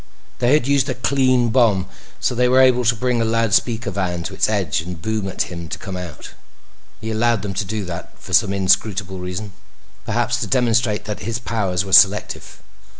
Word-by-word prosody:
They 120 Hz, +2 st, +3 dB
had 150 Hz, -5 st, +3 dB
used 140 Hz, -1 st, +2 dB
a 130 Hz, -, -2 dB
"clean" 130 Hz, -1 st, +2 dB
bomb. 110 Hz, -6 st, +2 dB, 0.3 s
So -, -, 0 dB
they 125 Hz, +1 st, +2 dB
were 130 Hz, +1 st, +4 dB
able 125 Hz, -1 st, +4 dB
to 115 Hz, 0 st, +3 dB
bring 125 Hz, +1 st, 0 dB
a -, -, +2 dB
loudspeaker 115 Hz, -1 st, +1 dB
van 90 Hz, -3 st, -2 dB
to 95 Hz, -, -6 dB
its 95 Hz, -, +1 dB
edge 95 Hz, -8 st, 0 dB
and 90 Hz, 0 st, -7 dB
boom 110 Hz, +2 st, -2 dB
at 95 Hz, -, -1 dB
him 85 Hz, -2 st, -8 dB
to -, -, -4 dB
come 95 Hz, -1 st, -7 dB
out. 90 Hz, -4 st, -8 dB, 0.7 s
He 110 Hz, +1 st, -5 dB
allowed 110 Hz, -1 st, +1 dB
them 100 Hz, -1 st, -4 dB
to 100 Hz, +3 st, -2 dB
do 105 Hz, +1 st, -4 dB
that 85 Hz, -1 st, -8 dB
for -, -, -11 dB
some 100 Hz, -, +4 dB
inscrutable 95 Hz, 0 st, 0 dB
reason; 90 Hz, +3 st, -5 dB, 0.5 s
perhaps -, -, -1 dB
to -, -, -2 dB
demonstrate 120 Hz, -4 st, +1 dB
that 105 Hz, -1 st, -5 dB
his 115 Hz, 0 st, -3 dB
powers 100 Hz, -6 st, -2 dB
were 95 Hz, -, -6 dB
selective. 100 Hz, +2 st, +3 dB
110 Hz, 200 wpm, -20 LUFS, 95-120 Hz, 0.7 s, were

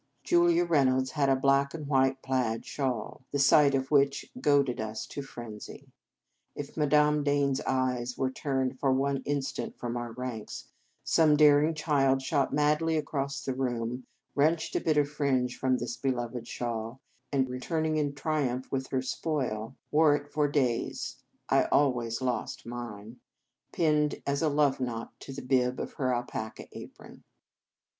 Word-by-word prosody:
Julia 175 Hz, 0 st, +4 dB
Reynolds 130 Hz, -5 st, +2 dB
had 140 Hz, -1 st, +1 dB
a 135 Hz, -, +5 dB
black 140 Hz, +2 st, +2 dB
and 155 Hz, -2 st, -6 dB
white 135 Hz, -1 st, +2 dB
plaid 125 Hz, -4 st, -1 dB
shawl, 130 Hz, -2 st, -3 dB
the 145 Hz, -, -2 dB
sight 140 Hz, 0 st, +5 dB
of 135 Hz, +1 st, -2 dB
which 140 Hz, -1 st, +2 dB
goaded 140 Hz, -5 st, +2 dB
us 110 Hz, 0 st, -4 dB
to 140 Hz, -, -6 dB
frenzy. 120 Hz, -6 st, -10 dB, 0.6 s
If 145 Hz, -1 st, -7 dB
Madame 150 Hz, 0 st, +3 dB
Dane 145 Hz, -1 st, +2 dB
s 135 Hz, +2 st, -1 dB
eyes 125 Hz, -2 st, 0 dB
were 130 Hz, -1 st, 0 dB
turned 130 Hz, -1 st, -2 dB
for 135 Hz, -, +2 dB
one 135 Hz, +1 st, +1 dB
instant 140 Hz, -2 st, -3 dB
from 120 Hz, 0 st, -4 dB
our 120 Hz, -1 st, -4 dB
ranks, 120 Hz, -3 st, -6 dB, 0.3 s
some 155 Hz, -2 st, +4 dB
daring 150 Hz, +1 st, +5 dB
child 135 Hz, -4 st, +2 dB
shot 140 Hz, 0 st, +1 dB
madly 150 Hz, +3 st, +2 dB
across 140 Hz, -2 st, -3 dB
the 135 Hz, -, -1 dB
room, 125 Hz, -1 st, -3 dB, 0.3 s
wrenched 155 Hz, +3 st, +1 dB
a -, -, +1 dB
bit 155 Hz, -2 st, +1 dB
of 145 Hz, -1 st, +3 dB
fringe 135 Hz, -4 st, 0 dB
from 130 Hz, -1 st, +2 dB
this 120 Hz, -1 st, -4 dB
beloved 120 Hz, -3 st, -3 dB
shawl, 115 Hz, +1 st, -4 dB, 0.3 s
and, 135 Hz, -2 st, +2 dB
returning 155 Hz, +5 st, -1 dB
in 145 Hz, -2 st, -1 dB
triumph 135 Hz, -4 st, -2 dB
with 130 Hz, -1 st, -2 dB
her 130 Hz, -1 st, -1 dB
spoil, 130 Hz, -5 st, -3 dB, 0.2 s
wore 150 Hz, -1 st, +5 dB
it 145 Hz, 0 st, -6 dB
for 150 Hz, -1 st, +2 dB
days 130 Hz, -5 st, -1 dB, 0.3 s
(I -, -, +3 dB
always 120 Hz, -4 st, +1 dB
lost 125 Hz, -2 st, -2 dB
mine) 115 Hz, -1 st, -7 dB, 0.5 s
pinned 150 Hz, -3 st, +1 dB
as 140 Hz, 0 st, 0 dB
a 160 Hz, -, +2 dB
love 145 Hz, -2 st, +2 dB
knot 115 Hz, -3 st, -4 dB
to -, -, -9 dB
the 135 Hz, -, -7 dB
bib 125 Hz, -1 st, +1 dB
of -, -, -5 dB
her 130 Hz, -2 st, -1 dB
alpaca 120 Hz, -2 st, -4 dB
apron. -, -, -12 dB
135 Hz, 160 wpm, -29 LUFS, 125-145 Hz, 0.6 s, a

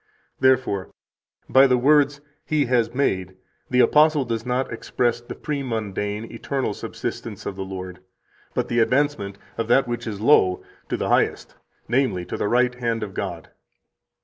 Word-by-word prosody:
Therefore, 130 Hz, -7 st, +2 dB, 0.6 s
by 135 Hz, +1 st, +6 dB
the 125 Hz, -1 st, +3 dB
words 145 Hz, +2 st, +3 dB, 0.2 s
He 150 Hz, -2 st, +1 dB
has 120 Hz, -2 st, +1 dB
made 95 Hz, -9 st, -1 dB, 0.3 s
the 125 Hz, 0 st, +4 dB
apostle 150 Hz, -1 st, +4 dB
does 115 Hz, 0 st, -3 dB
not 125 Hz, 0 st, -1 dB
express 120 Hz, 0 st, -1 dB
the 120 Hz, -, -8 dB
premundane 110 Hz, -7 st, -3 dB
[eternal] 130 Hz, 0 st, -2 dB
subsistence -, -, -6 dB
of 95 Hz, -, -4 dB
the 95 Hz, -, -4 dB
Lord, 95 Hz, -1 st, -7 dB, 0.6 s
but -, -, 0 dB
the 120 Hz, -, 0 dB
advancement 120 Hz, -5 st, +1 dB, 0.2 s
of 115 Hz, -, -1 dB
that 135 Hz, +2 st, +4 dB
which 120 Hz, 0 st, -4 dB
is 105 Hz, -2 st, -4 dB
low 105 Hz, -6 st, +4 dB, 0.3 s
to -, -, -1 dB
the -, -, -2 dB
Highest, -, -, +1 dB, 0.3 s
namely, 120 Hz, -7 st, +1 dB
to -, -, -5 dB
the -, -, -1 dB
right 125 Hz, +1 st, +3 dB
hand 115 Hz, -2 st, -2 dB
of 100 Hz, -2 st, -6 dB
God." 90 Hz, -5 st, -5 dB
120 Hz, 155 wpm, -23 LUFS, 105-130 Hz, 0.6 s, by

